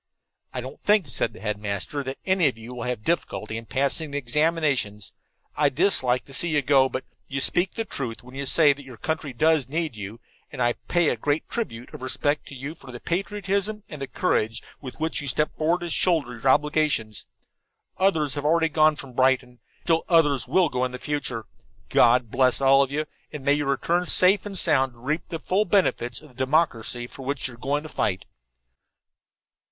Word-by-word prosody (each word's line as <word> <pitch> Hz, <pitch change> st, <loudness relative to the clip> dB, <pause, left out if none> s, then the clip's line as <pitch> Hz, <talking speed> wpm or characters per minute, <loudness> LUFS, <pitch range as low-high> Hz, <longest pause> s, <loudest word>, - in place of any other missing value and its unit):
"I -, -, -4 dB
don't -, -, -9 dB
think," 210 Hz, -5 st, +3 dB
said 115 Hz, -, 0 dB
the -, -, -12 dB
headmaster, 105 Hz, +5 st, -3 dB
"that 135 Hz, +1 st, -4 dB
any 190 Hz, -4 st, +3 dB
of 125 Hz, -, -2 dB
you 115 Hz, +2 st, -9 dB
will 120 Hz, -1 st, -5 dB
have 125 Hz, -4 st, -3 dB
difficulty 115 Hz, -9 st, -2 dB
passing 140 Hz, +6 st, 0 dB
the 145 Hz, -, -3 dB
examinations. 140 Hz, -6 st, 0 dB, 0.4 s
I 145 Hz, -1 st, +3 dB
dislike 130 Hz, -5 st, +1 dB
to 135 Hz, -, -12 dB
see 170 Hz, +5 st, 0 dB
you 150 Hz, -3 st, +1 dB
go, 135 Hz, -1 st, +4 dB
but 130 Hz, -, -4 dB, 0.2 s
you 135 Hz, -, -3 dB
speak 175 Hz, +7 st, +2 dB
the 225 Hz, -, -2 dB
truth 125 Hz, -, -5 dB
when 125 Hz, +1 st, -14 dB
you 140 Hz, 0 st, -4 dB
say 150 Hz, 0 st, +5 dB
that 140 Hz, 0 st, -12 dB
your 130 Hz, -3 st, -12 dB
country 155 Hz, 0 st, -3 dB
does 150 Hz, 0 st, +2 dB
need 160 Hz, -3 st, -2 dB
you, 105 Hz, +2 st, -7 dB, 0.3 s
and -, -, -9 dB
I 120 Hz, -1 st, +3 dB
pay 175 Hz, -3 st, +3 dB
a -, -, +1 dB
great 145 Hz, +6 st, -1 dB
tribute 125 Hz, -, -5 dB
of -, -, -9 dB
respect 145 Hz, +3 st, -1 dB
to 140 Hz, -, -9 dB
you 140 Hz, +4 st, -6 dB
for 135 Hz, -5 st, -13 dB
the 120 Hz, -, -8 dB
patriotism 200 Hz, -, -2 dB
and 140 Hz, -3 st, -7 dB
courage 115 Hz, -, 0 dB, 0.2 s
with 130 Hz, 0 st, -9 dB
which 160 Hz, 0 st, -1 dB
you 140 Hz, -, -6 dB
step 150 Hz, +3 st, 0 dB
forth 165 Hz, +3 st, +1 dB
to 175 Hz, -, -4 dB
shoulder 160 Hz, -8 st, +1 dB
your 120 Hz, +3 st, 0 dB
obligations. 150 Hz, -7 st, +1 dB, 0.7 s
Others 160 Hz, -8 st, +2 dB
already 160 Hz, +3 st, +2 dB
have -, -, -25 dB
gone 155 Hz, -1 st, +5 dB
from 135 Hz, -3 st, -9 dB
Brighton. 130 Hz, -1 st, +1 dB, 0.2 s
Still 165 Hz, -1 st, +2 dB
others 150 Hz, -7 st, +3 dB
will 180 Hz, -4 st, +3 dB
go 125 Hz, 0 st, -1 dB
in 130 Hz, 0 st, -2 dB
the -, -, -4 dB
future. 125 Hz, -5 st, -3 dB, 0.4 s
God 120 Hz, -1 st, +4 dB
bless 130 Hz, -2 st, +3 dB
all 135 Hz, 0 st, +5 dB
of 135 Hz, -1 st, 0 dB
you, 150 Hz, +2 st, -1 dB, 0.3 s
and 145 Hz, -3 st, -8 dB
may 140 Hz, -, +5 dB
you 145 Hz, -1 st, 0 dB
return 170 Hz, +6 st, 0 dB
safe 190 Hz, +2 st, +4 dB
and 195 Hz, -2 st, -3 dB
sound 135 Hz, -7 st, +3 dB
to -, -, -22 dB
reap 150 Hz, +7 st, -2 dB
the 165 Hz, -, -3 dB
full 190 Hz, +6 st, 0 dB
benefits 155 Hz, -, +1 dB
of 155 Hz, -, -14 dB
the -, -, -20 dB
democracy 130 Hz, -3 st, 0 dB
for 130 Hz, -, -11 dB
which 135 Hz, +1 st, -3 dB
you 130 Hz, -, -10 dB
are -, -, -13 dB
going 145 Hz, +4 st, -1 dB
to 155 Hz, -, -8 dB
fight." 95 Hz, -9 st, -1 dB
140 Hz, 200 wpm, -25 LUFS, 125-160 Hz, 0.7 s, say